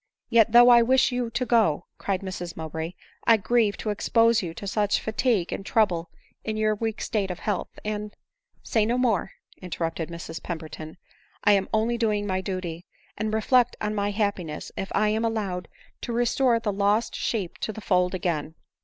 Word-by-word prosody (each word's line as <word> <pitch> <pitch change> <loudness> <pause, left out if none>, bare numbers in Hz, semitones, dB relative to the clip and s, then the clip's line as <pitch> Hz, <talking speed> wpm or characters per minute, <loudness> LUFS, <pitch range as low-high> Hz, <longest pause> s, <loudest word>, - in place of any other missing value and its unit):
" - - -60
Yet 230 -2 +5
though 240 +1 +8
I 240 -1 +8
wish 255 +1 +3
you 245 -1 -1
to 245 +2 -2
go," 215 -10 +2
cried 195 -2 -1
Mrs 180 -3 -6
Mowbray, 160 +1 -5 0.2
" - - -29
I 230 -1 +7
grieve 220 -1 +2
unexpose 230 +2 +3
you 175 -4 -4
to - - -7
such 205 0 +1
fatigue 220 -4 0
and - - -5
trouble 180 -6 +1 0.3
in 215 0 -3
your 215 0 +2
weak 220 +1 -3
state 200 -3 -1
of 180 - -4
health, 205 -1 -3
and 210 0 -3 0.2
" - - -60
" - - -64
Say 220 - +1
no 235 +3 +1
more? 225 -7 +1
" - - -29
interrupted 165 -2 -3
Mrs 170 -1 -7
Pemberton, 160 -1 -7 0.2
" - - -34
I 205 - +5
am 195 -1 +2
only 230 +2 +1
doing 210 -3 +1
my 190 -2 -1
duty; 180 -2 -5 0.3
and 215 +1 -2
reflect 235 +3 +3
on 210 0 -2
my 205 -1 0
happiness 200 -7 -2
if 195 - -5
I 210 +1 +3
am 220 +2 0
allowed 205 -6 -2 0.3
to 235 - -4
restore 240 0 +2
the 215 -3 -2
lost 205 +3 +1
sheep 200 -7 -2
to - - -2
the 215 - -8
fold 180 -3 +1
again 160 -4 -2
210 Hz, 195 wpm, -26 LUFS, 180-230 Hz, 0.3 s, though